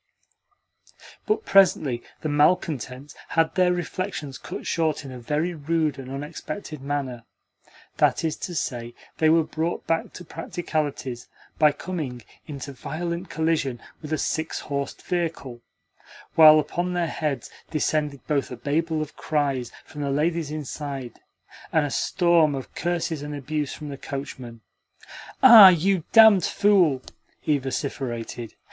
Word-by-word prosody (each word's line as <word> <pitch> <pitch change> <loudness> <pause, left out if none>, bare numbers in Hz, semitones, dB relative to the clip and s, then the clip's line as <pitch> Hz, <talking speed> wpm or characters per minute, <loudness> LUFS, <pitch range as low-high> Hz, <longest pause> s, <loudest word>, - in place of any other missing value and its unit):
But 430 +1 0
presently 155 -10 +4 0.2
the - - -2
malcontents 145 -3 0
had 165 -1 +1
their 180 -1 +3
reflections 175 -5 -4
cut - - -7
short 160 -3 0
in 135 - -8
a 125 - -8
very 150 +8 -1
rude 155 -2 -1
and 130 -1 -8
unexpected 150 +3 -6
manner. 135 -4 -3 0.7
That - - +2
is 155 -1 0
to 175 - -6
say, 120 -5 -3 0.2
they 155 - +4
were 165 0 +5
brought 160 +2 -3
back 165 0 -1
to 180 - -10
practicalities 150 -7 -4 0.3
by 150 -2 +5
coming 145 -8 -5 0.2
into 140 -2 -7
violent 170 +7 -5
collision 160 -6 0 0.2
with 155 -1 -8
a 155 - +1
six 160 +1 -2
horsed 140 -1 -4
vehicle, 165 -9 -3 0.7
while 155 -1 +9
upon 175 +3 -2
their 175 -1 0
heads 150 -3 -3 0.2
descended 150 -2 -1
both 145 -3 0
a 125 - -6
babel 155 +5 -1
of 150 - -11
cries 140 -5 -1
from 150 - -8
the 140 - -1
ladies 155 +2 0
inside 140 -4 -6 0.5
and 160 -2 +3
a 145 - -4
storm 170 -4 +3
of 135 - -7
curses 170 -3 -2
and 145 0 -5
abuse 145 +1 -3
from 150 - -7
the 140 - -6
coachman. 130 -5 -7 0.8
"Ah, 225 -7 +12
you 185 0 +1
damned 220 -5 +8
fool!" 180 -12 +3 0.4
he 150 -2 +1
vociferated. 125 -3 -4
150 Hz, 140 wpm, -24 LUFS, 140-165 Hz, 0.8 s, Ah